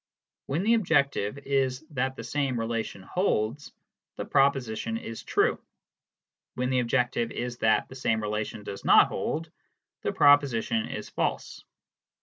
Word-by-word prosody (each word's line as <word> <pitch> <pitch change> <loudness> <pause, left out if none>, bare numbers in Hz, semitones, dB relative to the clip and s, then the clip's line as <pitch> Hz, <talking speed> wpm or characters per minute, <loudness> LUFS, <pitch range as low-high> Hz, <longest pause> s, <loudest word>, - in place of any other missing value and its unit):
When 155 +7 -1
the 225 +3 +4
objective 140 - +1
is 135 0 -1
that 130 -1 -1
the 115 - -7
same 135 0 -1
relation 115 -4 -3
holds, 140 - -1 0.4
the - - -5
proposition 130 -5 +1
is 115 0 -7
true; - - +1 0.9
when 125 +1 -1
the 130 - +2
objective 120 0 0
is 120 0 -5
that 110 - +2
the - - -12
same 115 -4 0
relation 105 0 -3
does 100 -1 -7
not - - +6
hold, 160 0 -3 0.5
the - - -1
proposi 145 -5 +4
tion 110 -1 -1
is - - -6
false. - - -3
125 Hz, 140 wpm, -27 LUFS, 115-140 Hz, 0.9 s, not